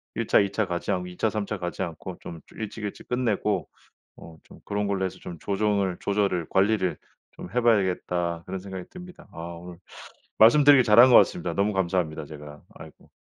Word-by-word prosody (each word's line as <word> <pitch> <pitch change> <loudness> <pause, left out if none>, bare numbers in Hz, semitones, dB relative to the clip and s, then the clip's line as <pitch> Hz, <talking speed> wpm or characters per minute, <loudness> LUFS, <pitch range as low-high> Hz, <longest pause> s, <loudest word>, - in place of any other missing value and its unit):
'1 115 -1 -3
차 - - +5
2 100 -1 +1
차 110 - 0
가지 85 -1 -3
않고 90 0 -3
2 90 0 -11
차 110 - +1
3 105 -1 -3
차 105 - -4
가지 90 0 -4
않고 85 +1 -7
좀 80 - -8 0.2
일찍 110 0 -6
일찍 100 - -8
끝내고 115 -4 -1 0.5
어 80 -1 -13
좀 - - -16
그런 105 0 -2
걸로 95 -1 -1
해서 95 - -6
좀 85 - -9
조정을 100 -2 0
조절을 100 -5 -1
관리를 95 -1 +1 0.4
좀 - - -10
해 125 - +1
봐야겠다.' 90 -6 0
그런 95 0 -5
생각이 95 -2 -7
듭니다. 180 0 -12
아 - - -15 0.2
오늘 90 0 -11 0.6
말씀드리기를 140 +3 +7
잘 105 +1 +6
한 130 +2 +8
것 120 - +8
같습니다. 180 -2 +3
너무 100 +2 +1
감사합니다 85 -5 -1
제가. 75 0 -11
아이고. - - -14
100 Hz, 365 characters per minute, -25 LUFS, 90-110 Hz, 0.6 s, 한